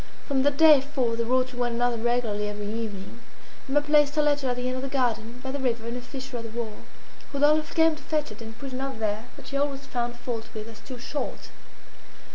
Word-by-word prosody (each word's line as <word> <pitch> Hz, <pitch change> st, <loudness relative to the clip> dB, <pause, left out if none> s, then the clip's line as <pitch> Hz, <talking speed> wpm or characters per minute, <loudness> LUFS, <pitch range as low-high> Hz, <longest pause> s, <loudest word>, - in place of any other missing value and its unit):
From 275 Hz, -2 st, +2 dB
that 285 Hz, +1 st, +2 dB
day 310 Hz, -3 st, +8 dB
forth 260 Hz, -5 st, -1 dB
they -, -, +3 dB
wrote 255 Hz, +2 st, +2 dB
to 250 Hz, -, -10 dB
one 240 Hz, -1 st, +1 dB
another 240 Hz, 0 st, +2 dB
regularly 225 Hz, -3 st, 0 dB
every 210 Hz, 0 st, -5 dB
evening. 215 Hz, 0 st, -5 dB, 0.5 s
Emma 290 Hz, +2 st, +4 dB
placed 295 Hz, 0 st, +4 dB
her 300 Hz, -, +4 dB
letter 290 Hz, -3 st, +2 dB
at 245 Hz, -, +1 dB
the 250 Hz, 0 st, -3 dB
end 255 Hz, 0 st, -1 dB
of -, -, -3 dB
the 275 Hz, -, -2 dB
garden, 240 Hz, -3 st, 0 dB
by 265 Hz, -, -3 dB
the 285 Hz, -, -3 dB
river, 235 Hz, -3 st, 0 dB
in 235 Hz, -, -3 dB
a 250 Hz, -, -4 dB
fissure 260 Hz, 0 st, -6 dB
of 230 Hz, -, -5 dB
the -, -, -5 dB
wall. 220 Hz, -3 st, -4 dB, 0.5 s
Rodolphe 300 Hz, +2 st, +3 dB
came 320 Hz, -1 st, +5 dB
to 300 Hz, -, -12 dB
fetch 300 Hz, -5 st, -1 dB
it, 215 Hz, +2 st, -10 dB
and 225 Hz, 0 st, -8 dB
put 275 Hz, -2 st, -6 dB
another 265 Hz, -1 st, -3 dB
there, 215 Hz, 0 st, -1 dB
that -, -, -11 dB
she 275 Hz, -, -1 dB
always 280 Hz, -1 st, -1 dB
found 240 Hz, -2 st, -2 dB
fault 240 Hz, -2 st, -4 dB
with 215 Hz, 0 st, -5 dB
as 225 Hz, -2 st, -11 dB
too 245 Hz, +5 st, -8 dB
short. 280 Hz, +4 st, -4 dB
250 Hz, 240 wpm, -27 LUFS, 230-280 Hz, 0.5 s, day